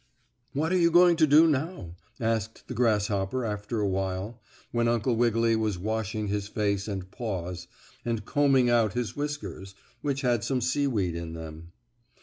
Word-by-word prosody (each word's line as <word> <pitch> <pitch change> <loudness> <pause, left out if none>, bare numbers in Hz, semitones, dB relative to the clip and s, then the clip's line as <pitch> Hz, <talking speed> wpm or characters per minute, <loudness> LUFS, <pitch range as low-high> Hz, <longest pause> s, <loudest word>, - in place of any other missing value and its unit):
"What 155 +4 0
are - - +4
you 170 -1 +5
going 175 +1 +6
to 155 -1 +5
do 150 +3 +7
now?" 145 - -2 0.2
asked 110 -1 -2
the - - -5
grasshopper 105 0 +1
after 105 +1 -3
a 105 - +1
while, 95 +4 -3 0.3
when 120 0 +1
Uncle 120 +1 +1
Wiggily 115 -1 +2
was 110 -4 0
washing 110 +2 -2
his 100 0 -2
face 100 -1 -1
and 95 -3 -5
paws, 90 -7 -5 0.4
and 115 -4 -2
combing 135 -3 +3
out 115 -4 +3
his 120 -1 -3
whiskers, 145 -10 -5 0.3
which 140 -1 -1
had 120 -4 +1
some 130 -2 0
seaweed 125 - 0
in 85 -1 -5
them. 80 +1 -9
110 Hz, 160 wpm, -27 LUFS, 100-130 Hz, 0.4 s, do